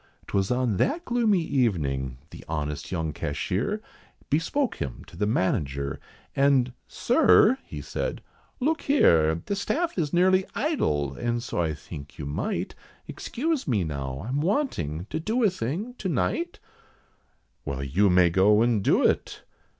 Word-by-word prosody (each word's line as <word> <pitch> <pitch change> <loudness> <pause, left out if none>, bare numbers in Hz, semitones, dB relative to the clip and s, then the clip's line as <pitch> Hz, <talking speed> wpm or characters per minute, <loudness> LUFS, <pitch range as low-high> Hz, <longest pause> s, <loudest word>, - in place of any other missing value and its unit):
'Twas 95 -1 0
on 125 -5 +1
that 325 - 0
gloomy 225 -7 +2
evening, 70 - 0
the - - -10
honest 75 -2 -3
young 80 -4 -2
cashier, 105 - -2 0.5
Bespoke 195 - 0
him 65 -4 -5
to - - -15
the 105 - 0
manager, 70 - -1 0.4
and 135 -3 +3
"Sir," 260 -2 +4 0.2
said - - -3 0.4
he, 255 - -3
"Look 320 +2 +1
here, 80 - +3
The 200 - -1
staff 310 - -1
is 150 -4 0
nearly 185 +2 +4
idle, 75 - 0
and 120 - -2
so 105 - -2
I 80 -2 -1
think 75 -1 -10
you - - -5
might 70 +1 -2 0.3
Excuse 300 - -2
me 110 -8 +1
now, 70 0 -4
I'm 135 +3 -1
wanting 150 - -1
to - - -1
do 225 +9 0
a 210 - +4
thing 180 - -3
to 190 - -2
night?" 155 - -1 1.1
"Well, 70 -1 -4
you 90 +10 +2
may 90 -1 +5
go 105 +5 +5
and 115 -4 +1
do - - +3
it." - - 0
115 Hz, 150 wpm, -26 LUFS, -, 1.1 s, may